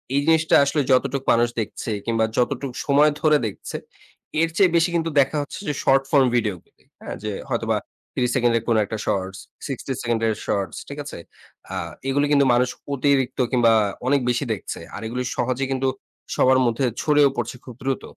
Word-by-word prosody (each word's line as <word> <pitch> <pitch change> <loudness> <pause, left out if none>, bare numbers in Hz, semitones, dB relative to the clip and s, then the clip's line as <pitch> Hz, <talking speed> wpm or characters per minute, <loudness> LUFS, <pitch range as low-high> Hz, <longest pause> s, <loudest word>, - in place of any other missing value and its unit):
এই - - +4
জিনিসটা 160 0 +4
আসলে 145 +1 +1
যতটুক 135 +1 +2
মানুষ 120 +1 +4
দেখছে 110 - -5
কিংবা 115 -1 +1
যতটুক 125 +2 0
সময় 145 +1 +5
ধরে 155 -1 +5
দেখছে, 100 - -6 0.6
এর 165 - +2
চেয়ে 190 -4 +4
বেশি 165 +1 +3
কিন্তু 165 -1 0
দেখা 140 +2 +2
হচ্ছে 145 - -7
যে, 150 - 0
শর্ট 135 0 +4
ফর্ম 140 -3 +5
ভিডিও 105 -5 +1
গুলি - - -33 0.2
হ্যা, - - -6
যে, 105 - -2 0.2
হয়তোবা - - 0 0.4
৩০ 125 -1 0
সেকেন্ডের 120 -3 +2
কোন 115 - +3
একটা 110 +2 -5
শর্টস 95 0 -2 0.3
60 135 0 -5
সেকেন্ডের 115 -2 0
শটস 100 -4 -2
ঠিক 140 - -8
আছে? 145 - -8 0.6
আ - - -3 0.3
এগুলি 145 +2 +2
কিন্তু 140 -1 +5
মানুষ 125 +1 +3 0.2
অতিরিক্ত 135 -1 +1
কিংবা 120 -3 +4 0.3
অনেক 140 +1 +3
বেশি 125 +3 0
দেখছে। 100 - -6 0.2
আর 105 - -6
এগুলি 125 +3 -3
সহজেই 130 +2 0
কিন্তু 135 0 0 0.5
সবার 130 0 +4
মধ্যে 120 +3 +1 0.2
ছড়িয়েও 145 -2 +4
পড়ছে 120 +1 -3
খুব 125 - -10
দ্রুত। 135 0 -1
130 Hz, 180 wpm, -23 LUFS, 115-140 Hz, 0.6 s, সময়